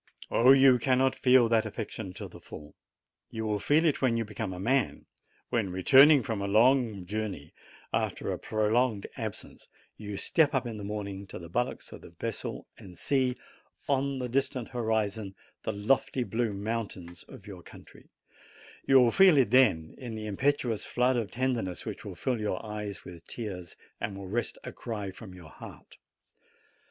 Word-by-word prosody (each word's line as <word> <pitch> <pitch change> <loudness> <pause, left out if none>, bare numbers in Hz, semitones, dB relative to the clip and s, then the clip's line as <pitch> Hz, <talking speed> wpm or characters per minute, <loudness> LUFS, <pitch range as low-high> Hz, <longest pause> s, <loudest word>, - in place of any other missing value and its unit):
Oh, 125 +3 +6
you 135 -2 +6
cannot 130 +2 +2
feel 125 -2 +4
that 110 -1 +2
affection 110 -2 -6
to - - -7
the - - -13
full! 75 -1 -11 0.6
You 110 0 -5
will 105 -1 -1
feel 155 +9 +3
it 155 - +1
when 125 -3 +2
you 115 - -1
become 105 -2 -5
a 90 - -7
man; 130 +4 0 0.4
when, 115 -6 0
returning 135 +10 +6
from 110 -2 -3
a 100 - -2
long 110 -2 +3
journey, 100 -7 -5 0.4
after - - -1
a - - -4
prolonged 110 0 0
absence, - - -7 0.3
you 105 -2 -6
step 155 - +2
up 130 -1 0
in 115 -2 -5
the 105 - -7
morning 100 -1 -5
to - - -8
the 85 -1 -10
bulwarks 125 +7 -3
of - - -10
the - - -12
vessel - - -5
and 90 -2 -13
see 130 -2 0 0.5
on 140 0 0
the 125 -1 -3
distant 130 -1 -1
horizon 110 -4 -2 0.3
the - - -2
lofty 125 +5 0
blue 115 -1 -1
mountains 100 -4 -5
of - - -13
your - - -10
country; - - -16 0.8
you 135 -1 +7
will 120 -2 +5
feel 190 -1 +6
it 125 -6 +3
then 105 -12 +4
in 120 -4 -6
the 110 0 -6
impetuous 120 0 0
flood 125 +1 +1
of 115 -4 -1
tenderness 120 -8 -2
which - - -6
will - - -7
fill 125 -4 -2
your 105 -1 -3
eyes 105 -2 -6
with 85 -2 -11
tears 95 -7 -6 0.2
and 100 -1 -4
will 100 -1 -8
wrest 120 +5 -2
a - - -6
cry 105 -5 -5
from 95 -1 -11
your 85 -4 -13
heart. - - -13
110 Hz, 175 wpm, -29 LUFS, 100-130 Hz, 0.8 s, you